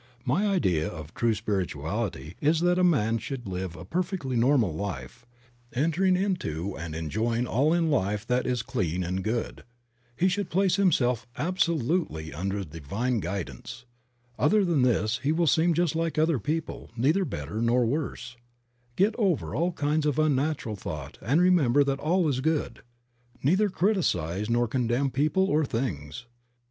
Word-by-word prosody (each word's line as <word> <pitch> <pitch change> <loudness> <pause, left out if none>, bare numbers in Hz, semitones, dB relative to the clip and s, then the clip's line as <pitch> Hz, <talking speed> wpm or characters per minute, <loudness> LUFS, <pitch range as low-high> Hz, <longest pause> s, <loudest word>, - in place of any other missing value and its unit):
My 175 +12 +1
idea 90 - +1
of 80 -2 -8
true 115 -2 +1
spirituality 95 - -3
is 155 +2 +2
that 175 +1 +3
a - - +3
man 115 -10 +3
should 125 +1 -6
live 90 -2 -4
a 80 - -9
perfectly 170 - -2
normal 120 - +3
life, 80 - -6 0.5
entering 165 +7 +2
into 100 - -2
and 80 -1 -6
enjoying 110 +9 -1
all 140 +6 +2
in 170 -2 +2
life 105 -5 0
that 125 +1 0
is 125 -2 0
clean 90 -7 -2
and 90 +2 -2
good. 115 +2 -3 0.5
He 180 - +2
should 195 +2 -1
place 190 +1 +2
himself 125 - +2
absolutely 165 - 0
under 95 +5 -2
the 80 -1 -10
divine 115 - -1
guidance. 90 - -6 0.5
Other 200 +7 +4
than 165 -6 +2
this 115 -2 +2
he 145 - +1
will 170 +2 +2
seem 165 +2 +3
just 170 -1 +1
like 165 -1 -1
other 155 -3 +2
people, 160 +8 -3
neither 155 +11 +3
better 105 - -4
nor 120 +1 +3
worse. 125 -2 -3 0.6
Get 200 +4 +3
over 160 - +1
all 170 +9 +1
kinds 150 -1 0
of 150 - 0
unnatural 150 -6 0
thought 75 -7 -7
and 135 - +2
remember 155 -7 +4
that 140 0 -1
all 170 +2 +2
is 135 -3 0
good. 150 -6 -1 0.6
Neither 190 +9 +3
criticize 105 - 0
nor 120 +1 +2
con 125 +1 -1
demn 130 +3 +1
people 155 +9 +2
or 155 -3 +2
things. 110 - -3
125 Hz, 160 wpm, -27 LUFS, 100-165 Hz, 0.6 s, Other